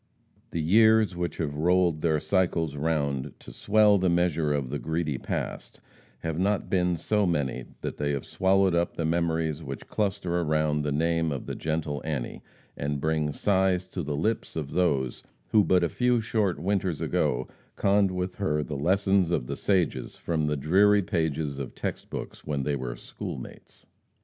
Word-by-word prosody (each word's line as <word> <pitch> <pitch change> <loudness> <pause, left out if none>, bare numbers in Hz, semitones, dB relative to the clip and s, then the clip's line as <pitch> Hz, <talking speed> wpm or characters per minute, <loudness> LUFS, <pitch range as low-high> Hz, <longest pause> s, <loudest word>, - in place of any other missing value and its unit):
The 85 - -3
years 110 +2 +5
which 85 -2 -3
have 75 -4 -2
rolled 85 +1 +2
their 80 -2 +2
cycles 85 -4 0
round 70 -3 -1
to - - -12
swell 105 - +4
the 90 0 +2
measure 85 -3 +1
of 70 -3 -1
the 75 - -2
greedy 80 -4 -2
past, - - -5 0.4
have 80 0 -3
not 100 +2 0
been 90 -2 +2
so 105 +4 +1
many 70 -7 -1 0.2
that - - -4
they 75 -1 0
have 70 - -3
swallowed 95 0 +2
up 85 0 0
the 80 - -1
memories 80 -2 0
which 70 -3 -7
cluster 95 -4 -1
around 75 -1 +1
the 75 0 -1
name 80 +2 +1
of 70 - -4
the - - -4
gentle 75 -2 -2
Annie, 75 -6 -4 0.3
and 70 0 -2
bring 75 0 0
sighs 95 +1 +1
to 90 - -4
the 75 -2 -3
lips 110 +9 -1
of 75 -4 -4
those 70 -8 0 0.3
who 105 -2 +5
but 90 -2 +3
a - - +3
few 125 +3 +2
short 110 -4 0
winters 95 -1 -1
ago - - 0 0.3
conned 100 0 +3
with 90 0 -3
her 75 -7 0
the 75 - -5
lessons 95 +3 +2
of 85 -8 0
the - - -4
sages 95 -6 0
from 80 -3 -1
the 75 0 0
dreary 100 +8 +4
pages 80 -5 -1
of 70 - -6
text - - -4
books - - -7
when 70 -2 -2
they 75 +1 0
were 65 -3 -4
schoolmates. - - -9
80 Hz, 175 wpm, -27 LUFS, 75-95 Hz, 0.4 s, years